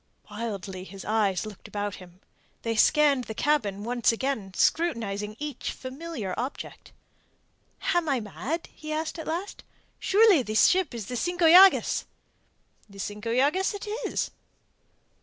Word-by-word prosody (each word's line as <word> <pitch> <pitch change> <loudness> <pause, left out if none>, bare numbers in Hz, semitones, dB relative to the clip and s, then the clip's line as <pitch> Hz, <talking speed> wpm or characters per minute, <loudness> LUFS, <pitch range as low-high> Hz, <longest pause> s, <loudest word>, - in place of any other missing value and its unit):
Wildly 200 -4 -5
his 195 0 -10
eyes 210 -3 +1
looked 210 -3 -10
about 205 -1 -3
him. 180 0 -15 0.4
They 230 -1 -1
scanned 280 +2 +4
the 220 - -7
cabin 215 -10 0
once 240 +1 +2
again, 230 -5 -3
scrutinizing 215 -10 0
each 295 +1 -4
familiar 260 - -6
object. 255 +4 -6 1.0
"Am 345 -3 +1
I 270 -3 +2
mad?" 255 - -4
he 310 0 -8
asked 315 +2 -3
at 320 - -7
last. 345 +5 -4 0.4
"Surely 405 -6 +5
this 215 -2 +3
ship 365 -9 +2
is 225 -4 -5
the 250 - -5
Cinco 350 +6 0
Llagas?" 370 +4 +7 0.8
"The 200 - -14
Cinco 210 +3 -4
Llagas 295 - +2
it 405 - -7 0.2
is." - - -2
245 Hz, 140 wpm, -27 LUFS, 210-320 Hz, 1.0 s, Llagas